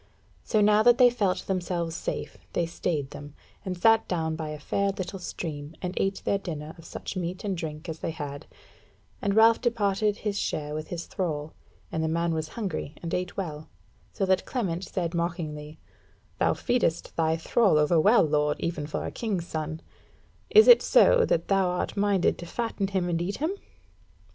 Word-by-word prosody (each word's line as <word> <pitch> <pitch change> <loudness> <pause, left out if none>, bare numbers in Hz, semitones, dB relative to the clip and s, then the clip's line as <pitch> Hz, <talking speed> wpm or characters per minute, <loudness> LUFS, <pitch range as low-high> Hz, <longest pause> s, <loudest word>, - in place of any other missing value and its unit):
So 215 - +1
now 210 +1 +5
that 240 +1 +6
they 245 -1 +7
felt 200 -6 0
themselves 175 -3 -2
safe, - - -4
they 170 - +1
stayed 160 -4 -2
them, 145 0 -10 0.3
and 185 -1 -4
sat 225 +4 +4
down 160 -3 -1
by 155 -1 -4
a 150 - -5
fair 200 +7 0
little 195 0 -4
stream, 155 -3 -6
and 180 -1 -4
ate 195 0 -1
their 200 - +1
dinner 155 -4 -6
of 165 - -13
such - - -7
meat 180 0 -4
and 200 -2 -1
drink 160 -1 -6
as 160 -1 -5
they - - -3
had; 145 -3 -6 0.7
and 200 0 0
Ralph 225 +1 +6
departed 210 -3 +1
his 205 -1 -2
share 150 -1 -2
with 155 0 -4
his 170 -1 -5
thrall, 155 -4 -3 0.4
and 160 - -1
the - - +1
man 170 +1 0
was 160 -1 -2
hungry 190 -8 -3
and 165 - -4
ate 180 0 -2
well; 155 -5 -5 0.4
so 195 - -1
that 190 0 +2
Clement 190 -8 -2
said 175 -3 -3
mockingly: 160 -3 -3 0.6
"Thou - - +3
feedest 235 -9 0
thy 160 0 +1
thrall 190 +1 +3
over 150 +2 +4
well, 215 +8 +6
lord, 150 -1 +1
even 160 -3 -3
for 150 - -3
a - - -4
king's 200 -7 -2
son: 155 -1 -4 0.7
is 435 -1 +7
it 485 -1 +9
so - - +5
that 170 - 0
thou 195 -2 +3
art 180 0 -2
minded 200 -3 +2
to 175 - -7
fatten 225 -1 -2
him 190 -2 -1
and 170 -1 0
eat 195 +3 -2
him?" 315 +5 0
175 Hz, 185 wpm, -27 LUFS, 160-200 Hz, 0.7 s, it